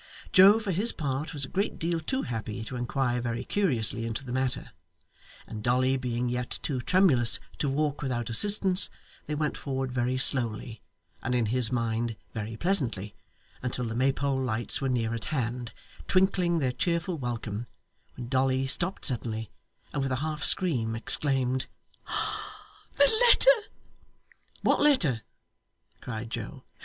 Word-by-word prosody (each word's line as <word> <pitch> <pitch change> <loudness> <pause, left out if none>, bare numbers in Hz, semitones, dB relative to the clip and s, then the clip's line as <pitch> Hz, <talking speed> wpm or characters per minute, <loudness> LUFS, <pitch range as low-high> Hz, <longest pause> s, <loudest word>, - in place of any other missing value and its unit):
Joe, 195 +3 +8
for 215 -3 -3
his 200 +7 +3
part, 145 0 -4
was 145 -5 -2
a - - -10
great 200 +2 -2
deal 165 0 -1
too 260 +12 -2
happy 110 -2 -5
to 120 - -7
inquire 125 0 -1
very 120 +1 -3
curiously 120 - +2
into 115 +3 -4
the 125 - -7
matter; 130 0 -3 0.7
and 110 - -8
Dolly 130 +3 +1
being 125 -1 -2
yet 125 0 -3
too 130 -4 -2
tremulous 140 - +2 0.2
to 140 - 0
walk 145 +1 -1
without 120 -5 -3
assistance, 190 - +3 0.4
they 150 - -3
went 150 0 -2
forward 135 -2 -4
very 125 +1 -1
slowly, 115 -4 +6 0.4
and 125 -1 -2
in 120 -2 +1
his 120 +1 0
mind 115 -1 -2 0.2
very 110 0 -5
pleasantly, 120 - +2 0.5
until 125 -1 -3
the 115 - -4
Maypole 135 +2 0
lights 120 0 -2
were 135 - -1
near 115 -3 -1
at 115 -1 -4
hand, 120 -5 -3 0.4
twinkling 185 -2 +2
their 135 -5 0
cheerful 170 +5 -2
welcome, 120 -2 -5 0.5
when 120 -1 -7
Dolly 130 +1 +1
stopped 175 +8 0
suddenly 115 -4 -3 0.4
and 145 - -2
with 135 -1 -2
a - - +1
half 155 -1 -4
scream 125 -12 +2
exclaimed, 130 +1 +2 1.3
'The 285 +10 +4
letter!' - - +5 0.9
'What - - +2
letter?' 180 - +3 0.8
cried 115 -1 -6
Joe. - - -6
130 Hz, 150 wpm, -27 LUFS, 120-155 Hz, 1.3 s, Joe